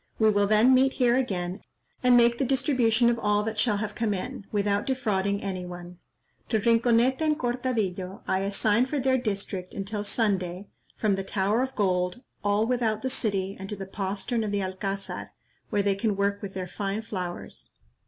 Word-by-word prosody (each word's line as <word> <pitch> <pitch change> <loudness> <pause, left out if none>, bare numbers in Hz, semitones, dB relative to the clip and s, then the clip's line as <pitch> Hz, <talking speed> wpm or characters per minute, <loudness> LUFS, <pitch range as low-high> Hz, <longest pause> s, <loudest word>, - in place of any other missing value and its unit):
We 220 -1 +4
will 205 -1 +2
then 215 +5 +5
meet 265 +1 +4
here 245 -2 +3
again, 190 -7 -1 0.4
and 250 -1 +6
make 235 0 +4
the - - +2
distribution 250 -3 +2
of 235 0 +2
all 210 -1 +2
that 220 0 -3
shall 210 -2 +2
have 210 0 -3
come 215 -2 0
in, 195 +1 -6
without 205 +3 0
defrauding 200 -6 0
any 190 -2 -3
one. 175 0 -9 0.5
To 220 - +2
Rinconete 235 +4 +3
and 305 -1 +2
Cortadillo 220 -7 -2
I 190 - +1
assign 205 +4 +2
for 295 - -2
their 260 -1 +2
district, 200 -5 -4
until 205 +1 -3
Sunday, 195 -3 -1 0.3
from 205 -3 +1
the 195 - -2
Tower 200 +4 +1
of 260 0 -3
Gold, 185 +2 0 0.2
all 205 +1 +2
without 230 -3 0
the 260 - -1
city, 195 -5 -1
and 195 0 -7
to 210 - -3
the 195 -1 -6
postern 200 +4 -2
of 210 - -2
the 200 -1 0
Alcazar, 195 +1 -4 0.4
where 205 - +1
they 200 0 +3
can 205 +1 0
work 200 +1 0
with 195 -2 -7
their 185 -1 -3
fine 200 +4 -3
flowers. 180 -5 -5
210 Hz, 185 wpm, -27 LUFS, 195-235 Hz, 0.5 s, and